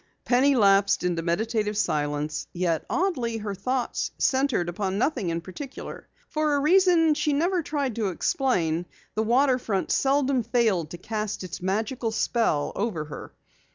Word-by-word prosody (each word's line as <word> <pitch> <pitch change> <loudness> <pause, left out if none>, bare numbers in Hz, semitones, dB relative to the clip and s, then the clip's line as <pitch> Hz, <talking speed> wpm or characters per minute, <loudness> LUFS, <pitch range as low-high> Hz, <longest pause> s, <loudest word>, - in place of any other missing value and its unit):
Penny 265 +3 +4
lapsed 200 -4 +4
into 175 -2 0
meditative 210 +5 -1
silence, 150 -5 -1
yet 170 -3 -1
oddly 260 -12 0
her 210 -2 -4
thoughts 250 +6 -2
centered 260 -9 +1
upon 190 +2 -2
nothing 245 - 0
in 165 0 -2
particular. 255 - -8 0.2
For 305 -1 0
a - - +2
reason 335 0 +4
she 295 0 0
never 345 +5 +1
tried 285 -6 -2
to 215 -3 0
explain, 175 -5 0 0.3
the 220 - 0
waterfront 245 -3 +1
seldom 270 -1 +2
failed 220 - +1
to 175 - -7
cast 210 +2 -4
its 180 -1 -7
magical 220 +6 -1
spell 220 -8 0
over 195 -7 -2
her. 150 - -9
220 Hz, 145 wpm, -26 LUFS, 180-270 Hz, 0.3 s, Penny